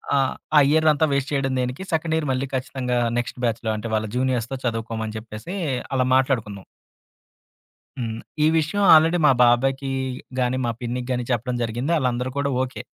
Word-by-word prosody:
ఆహ్, 135 -1 +2 0.2
ఆ - - +10
ఇయర్ 155 +1 +3
అంతా 150 +1 +2
వేస్ట్ 140 0 -1
చేయడం 135 -1 0
దేనికి, 125 +7 -3
సెకండ్ 160 0 0
ఇయర్ 160 -2 -1
మళ్ళీ 130 +1 -1
ఖచ్చితంగా 125 -1 -2 0.2
నెక్స్ట్ 120 +1 -3
బ్యాచ్‌లో 115 -1 -1
అంటే 110 +2 -5
వాళ్ళ 110 0 0
జూనియర్స్‌తో 125 -1 0
చదువుకోమని 115 -1 -3
చెప్పేసి 110 - -8 0.4
అలా 130 -1 +2
మాట్లాడుకున్నాం. 115 -7 0 1.3
హ్మ్. 115 -3 -3 0.3
ఈ - - +5
విషయం 160 +6 0
ఆల్రెడీ 165 +2 +5
మా - - +7
బాబాయికి 135 +3 +2 0.5
గాని, 125 0 +1
మా - - +1
పిన్నికి 125 +1 -4
గాని 125 -1 -1
చెప్పడం 120 +1 -1
జరిగింది. 120 +7 -2
ఆళ్ళందరూ 125 -2 -1
కూడా 140 0 0
ఓకే. 130 0 -5
125 Hz, 160 wpm, -23 LUFS, 120-140 Hz, 1.3 s, ఆ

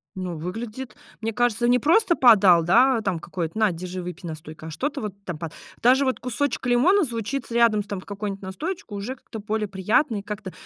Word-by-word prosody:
Ну 180 -3 -4
выглядит 220 +8 -6 0.3
мне 225 +1 -1
кажется 240 0 +1
не 250 +1 +4
просто 345 - +3
подал, 200 - +6
да, 240 +7 +4
там 190 -5 -1
какой-то: 170 +2 -5
на 215 -3 +3
держи 180 +2 -6
выпей 180 0 -7
настойкой. 155 0 -8
А - - -8
что-то 280 - -3
вот 210 -3 -4
там 175 -3 -4
па 165 +1 -5 0.3
даже 255 +4 +5
вот 260 - 0
кусочек 260 +3 -2
лимона 275 +12 +4
звучит 240 0 -4
рядом 230 -3 +3
там 200 -2 -5
с - - -17
какой-нибудь 200 -1 -5
настоечкой, 210 - -5
уже 225 +7 -4
как-то 230 -3 -10
более 215 0 -2
приятно, 210 +6 +1
и - - -4
как-то 205 -1 -6
215 Hz, 195 wpm, -24 LUFS, 185-245 Hz, 0.3 s, подал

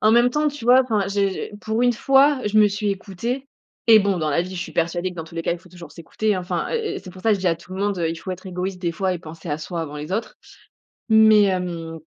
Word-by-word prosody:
en 215 +1 +4
même 240 +1 +5
temps, 300 +3 +1
tu 290 -5 -8
vois, 250 +2 +6
enfin, 220 -6 0
j'ai 200 0 +1
j'ai 190 - -6
pour 220 +2 -1
une 245 0 +4
fois, 270 +3 +4
je 215 +1 +2
me 210 -1 +6
suis 205 +1 -2
écoutée 225 +7 -4 0.4
et 220 -1 +9
bon, 200 -2 0
dans 155 -2 -1
la 160 +4 +2
vie 185 +1 -7
je 175 - -4
suis - - -6
persuadée 175 +2 -1
que - - -11
dans 165 - -5
tous 165 - -15
les 165 - -2
cas - - -1
il 175 - -5
faut 180 +1 -20
toujours 175 -1 -12
s'écouter 205 +5 -2
enfin, 180 -1 -2
heu 450 -2 -2
heu, - - -4
c'est 185 - -10
pour 185 0 -13
ça 225 - +2
que 210 - +4
je - - -9
dis 185 - -2
à 165 - +1
tout 170 +3 -14
le 190 - -5
monde, 200 -2 0
heu: 165 - 0
«Il 165 - -4
faut 185 - -7
être 185 +1 -7
égoïste 180 +1 -4
des 170 -1 0
fois 190 +1 -1
et - - -5
penser 165 0 -10
à 145 - 0
soi 165 +2 -5
avant 150 -2 -7
les 150 +5 -6
autres» 215 +1 -3 0.7
mais 220 -1 +7
hem, 175 -4 -2
190 Hz, 300 wpm, -22 LUFS, 175-220 Hz, 0.7 s, et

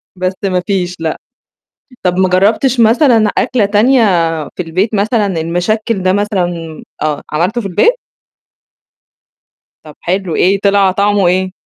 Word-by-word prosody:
بس 185 +1 -2
ما 185 -2 0
فيش 180 -3 -1
لأ. 160 -1 -3 0.9
طَب 180 0 0
ما 185 -1 +2
جرّبتش 220 +7 +2
مثلًا 230 -2 +4
أكلة 240 -4 +1
تانية 230 +5 +3 0.5
في 180 - -3
البيت 185 +7 -2
مثلًا 210 +2 +1 0.2
المشكّل 190 +5 -1
ده 185 - +2
مثلًا 195 -3 -1 0.5
آه، 150 -1 -1
عملته 185 +10 -1
في 200 - -5
البيت؟ 465 - +2 1.9
طَب 150 -2 -13
حلو 185 -1 -2
إيه، 195 +2 +2
طلع 200 -1 +3
طعمه 200 -1 +1
إيه؟ 185 +1 0
195 Hz, 135 wpm, -13 LUFS, 180-215 Hz, 1.9 s, مثلًا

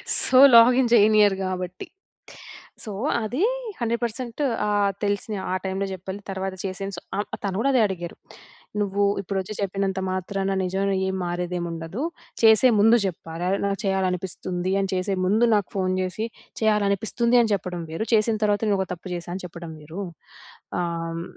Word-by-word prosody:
So, 255 - +3 0.2
login 245 +1 +7
జేయనియరు 210 -3 +5
గాబట్టి. 185 -1 -4 1.0
So, 215 - -6 0.3
అది 250 - -1 0.4
100% 235 +2 -2 0.3
ఆహ్, 205 -1 +2
తెలిసిన 205 +1 -1 0.2
ఆ - - 0
టైములో 190 +1 -2
జెప్పలే 190 +2 -7
తర్వాత 190 0 -3
చేసేను 195 +1 -4
స - - -3 0.2
ఆహ్, 205 - -2 0.2
తను 195 -2 -2
గూడా 275 +5 +2
అదే 250 - +4
అడిగారు. 175 -3 -6 0.6
"నువ్వు 200 0 0 0.2
ఇప్పుడొచ్చి 195 +1 -3
చెప్పినంత 195 -1 -1
మాత్రాన 195 +1 -2
నిజంలో 195 +2 0
ఏం 190 - -1
మారేదేం 175 0 -2
ఉండదు. 165 +8 -5 0.4
చేసే 225 +2 +7
ముందు 225 +3 +6
జెప్పాల 165 -2 -5 0.2
నాకు 200 0 -1
చేయాలనిపిస్తుంది 185 -1 -1
అని 195 -1 -1
చేసే 185 +2 0
ముందు 215 +6 +3
నాకు 205 -3 +1
ఫోను 185 -1 0
జేసి 185 +4 -2 0.3
చేయాలనిపిస్తుంది 215 +2 +1
అని 230 - +1
జేప్పడం 180 -3 -3
వేరు, 165 +7 -3
చేసిన 220 +1 +3
తర్వాత 205 -1 +2
నేను 200 -2 +2
ఒక 190 - 0
తప్పు 180 +2 -10
జేశా 175 0 -6
అని 190 - -6
చెప్పడం 170 -1 -8
వేరు." 165 +7 -6 0.8
ఆహ్, 165 -1 -3
195 Hz, 150 wpm, -24 LUFS, 185-215 Hz, 1.0 s, login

